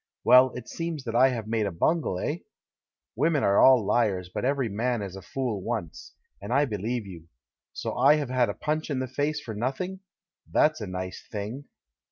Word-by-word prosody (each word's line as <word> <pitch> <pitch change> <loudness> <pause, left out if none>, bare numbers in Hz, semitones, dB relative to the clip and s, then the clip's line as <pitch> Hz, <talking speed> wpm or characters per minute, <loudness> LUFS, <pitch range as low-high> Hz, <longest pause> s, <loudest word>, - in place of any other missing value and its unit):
Well, 125 0 +7
it 125 -1 -7
seems 165 -4 -4
that 115 -3 -4
I 130 +2 +6
have 115 -4 -3
made 110 -1 0
a - - -3
bungle, 120 - 0
eh? - - -2 0.8
Women 150 +3 +2
are 100 0 +4
all 125 -6 +6
hars, 100 -5 +1
but - - -3
every 135 -1 +1
man 115 +2 -1
is 95 -1 -7
a 95 - -8
fool 110 +2 -3
once, 110 -7 -5 0.3
and 100 - -6
I 140 +3 +4
beheve 110 0 -3
you. 85 -4 -11 0.4
So - - -4
I 150 - +6
have 145 -4 -3
had 125 -3 +2
a 100 - -3
punch 155 +1 -2
in 140 - -1
the 130 0 -2
face 145 +4 -1
for 115 -6 -7
nothing? 135 - -3 0.5
That's 155 -4 +3
a 105 - -4
nice 95 0 -5
thing!" 110 +7 -5
120 Hz, 200 wpm, -27 LUFS, 100-140 Hz, 0.8 s, Well